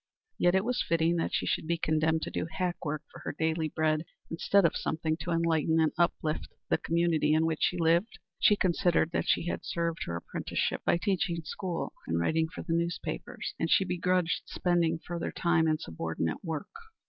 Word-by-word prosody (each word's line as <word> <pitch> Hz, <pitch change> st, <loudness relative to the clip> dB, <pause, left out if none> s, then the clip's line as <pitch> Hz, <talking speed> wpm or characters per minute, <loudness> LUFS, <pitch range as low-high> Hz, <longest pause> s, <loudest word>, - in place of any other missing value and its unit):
Yet 175 Hz, +2 st, +4 dB
was 250 Hz, +1 st, 0 dB
it -, -, -14 dB
fitting 165 Hz, +1 st, +3 dB
that 165 Hz, -, -1 dB
she -, -, 0 dB
should -, -, -1 dB
be 170 Hz, +1 st, +1 dB
condemned 160 Hz, 0 st, +1 dB
to -, -, -4 dB
do -, -, -2 dB
hack 180 Hz, -2 st, -2 dB
work 155 Hz, -1 st, -3 dB
for -, -, -11 dB
her -, -, -5 dB
daily 160 Hz, 0 st, 0 dB
bread 155 Hz, 0 st, +1 dB, 0.3 s
instead 190 Hz, +3 st, +3 dB
of 165 Hz, -, +2 dB
something 160 Hz, 0 st, -1 dB
to 175 Hz, -, -6 dB
enlighten 165 Hz, -1 st, +2 dB
and 160 Hz, -1 st, +3 dB
uplift 160 Hz, -2 st, 0 dB, 0.2 s
the -, -, +2 dB
community 165 Hz, -2 st, +2 dB
in 160 Hz, +1 st, +3 dB
which 160 Hz, -1 st, -1 dB
she 180 Hz, -, +2 dB
lived? 170 Hz, +5 st, +2 dB, 0.2 s
She 210 Hz, -, +6 dB
considered 175 Hz, -3 st, +2 dB
that -, -, -1 dB
she -, -, +2 dB
had 175 Hz, -, -3 dB
served 170 Hz, -2 st, -2 dB
her 85 Hz, -, -3 dB
apprenticeship 85 Hz, -, -2 dB
by -, -, +4 dB
teaching 180 Hz, -3 st, -1 dB
school 175 Hz, +2 st, -4 dB
and 85 Hz, 0 st, 0 dB
writing 160 Hz, -, +1 dB
for -, -, -7 dB
the 165 Hz, -, -2 dB
newspapers, 170 Hz, -, -3 dB
and 165 Hz, -, 0 dB
she 195 Hz, -, +4 dB
begrudged 180 Hz, -1 st, +1 dB
spending 170 Hz, -2 st, +1 dB
further 170 Hz, +1 st, -4 dB
time 170 Hz, -2 st, +2 dB
in 155 Hz, -1 st, +2 dB
subordinate 80 Hz, -, -3 dB
work. 160 Hz, -4 st, -4 dB
165 Hz, 195 wpm, -30 LUFS, 160-175 Hz, 0.3 s, She